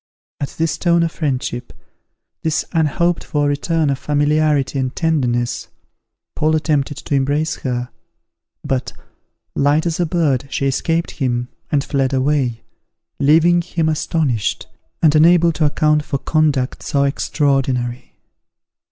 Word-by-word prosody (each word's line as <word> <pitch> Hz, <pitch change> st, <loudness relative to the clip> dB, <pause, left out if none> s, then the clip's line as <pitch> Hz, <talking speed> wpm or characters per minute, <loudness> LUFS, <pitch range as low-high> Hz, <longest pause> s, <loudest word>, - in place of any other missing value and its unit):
At 140 Hz, -, -5 dB
this 165 Hz, -1 st, -1 dB
tone 170 Hz, -1 st, +3 dB
of 165 Hz, -, -1 dB
friendship, 130 Hz, -5 st, -3 dB, 0.7 s
this 160 Hz, -1 st, 0 dB
unhoped 165 Hz, +2 st, +1 dB
for 145 Hz, -3 st, 0 dB
return 150 Hz, +1 st, 0 dB
of 135 Hz, -, -2 dB
familiarity 145 Hz, -2 st, +1 dB
and 130 Hz, -1 st, -2 dB
tenderness, 125 Hz, -7 st, 0 dB, 0.7 s
Paul 155 Hz, +1 st, +2 dB
attempted 150 Hz, -2 st, 0 dB
to -, -, -5 dB
embrace 145 Hz, +3 st, 0 dB
her; 125 Hz, -1 st, -3 dB, 0.8 s
but, 130 Hz, -1 st, -2 dB, 0.6 s
light 145 Hz, +3 st, +2 dB
as 165 Hz, -1 st, -1 dB
a 175 Hz, -, +1 dB
bird, 150 Hz, -6 st, 0 dB
she 140 Hz, -, -2 dB
escaped 165 Hz, +5 st, 0 dB
him, 125 Hz, -3 st, -2 dB, 0.2 s
and 140 Hz, -2 st, +2 dB
fled 135 Hz, -2 st, 0 dB
away, 130 Hz, -3 st, 0 dB, 0.6 s
leaving 165 Hz, +5 st, +4 dB
him 165 Hz, -2 st, -1 dB
astonished, 150 Hz, -7 st, -1 dB, 0.4 s
and 155 Hz, -2 st, +6 dB
unable 170 Hz, +2 st, +5 dB
to 155 Hz, 0 st, 0 dB
account 150 Hz, 0 st, +2 dB
for 140 Hz, -, -2 dB
conduct 145 Hz, -3 st, 0 dB
so 140 Hz, -2 st, 0 dB
extraordinary. 135 Hz, -4 st, -1 dB
145 Hz, 125 wpm, -19 LUFS, 135-160 Hz, 0.8 s, and